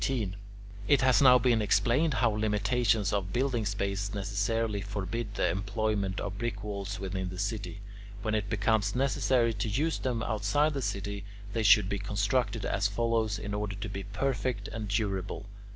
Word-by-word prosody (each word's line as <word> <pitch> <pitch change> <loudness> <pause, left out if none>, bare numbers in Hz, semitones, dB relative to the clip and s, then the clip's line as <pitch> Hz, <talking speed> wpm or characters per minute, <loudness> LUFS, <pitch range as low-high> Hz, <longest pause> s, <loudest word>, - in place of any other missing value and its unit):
It 140 - +5
has 130 0 +4
now 125 -2 +8
been 120 -3 +3
explained 125 +8 +2
how 115 0 +3
limitations 105 0 +1
of 95 -2 -1
building 120 -3 0
space 100 0 -2
necessarily 100 +2 -1
forbid 105 +2 -4
the - - +2
employment 100 +1 -1
of 100 0 -4
brick 110 -3 -3
walls 100 -1 -4
within 95 -1 -3
the 90 - -7
city. 100 +1 -3 0.4
When 110 0 -1
it 105 -2 -1
becomes 105 0 +1
necessary 130 -3 +2
to 110 +1 -2
use 150 +10 0
them 120 -3 -1
outside 120 +9 +1
the 140 - -2
city, 100 -2 -3 0.3
they 115 - 0
should 105 -2 +6
be 100 0 -2
constructed 105 +3 0
as 100 +1 +1
follows 110 0 0
in 105 -1 -5
order 105 -1 -2
to 100 +2 -5
be 100 0 -5
perfect 120 +4 -2
and 110 -2 -5
durable. 100 -1 -2
105 Hz, 165 wpm, -30 LUFS, 100-115 Hz, 0.4 s, now